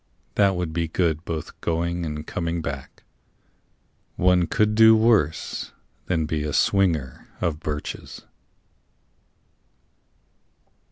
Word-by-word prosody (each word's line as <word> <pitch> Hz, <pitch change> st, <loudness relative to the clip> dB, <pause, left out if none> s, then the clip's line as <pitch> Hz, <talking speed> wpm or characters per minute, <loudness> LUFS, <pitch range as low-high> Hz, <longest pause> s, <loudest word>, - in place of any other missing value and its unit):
That 100 Hz, +2 st, +3 dB
would 90 Hz, -3 st, -3 dB
be 85 Hz, 0 st, -1 dB
good 80 Hz, -1 st, 0 dB
both 80 Hz, -2 st, -6 dB
going 85 Hz, +1 st, -1 dB
and 75 Hz, 0 st, -5 dB
coming 85 Hz, -1 st, -3 dB
back. 70 Hz, -2 st, -7 dB, 1.1 s
One 90 Hz, -1 st, +3 dB
could 105 Hz, 0 st, +2 dB
do 110 Hz, +1 st, +7 dB
worse 110 Hz, -9 st, +1 dB, 0.3 s
than 80 Hz, -3 st, +1 dB
be 75 Hz, 0 st, -2 dB
a 75 Hz, -1 st, -3 dB
swinger 80 Hz, -10 st, +1 dB
of 80 Hz, -4 st, -1 dB
birches. 75 Hz, -2 st, -6 dB
85 Hz, 105 wpm, -24 LUFS, 75-90 Hz, 1.1 s, do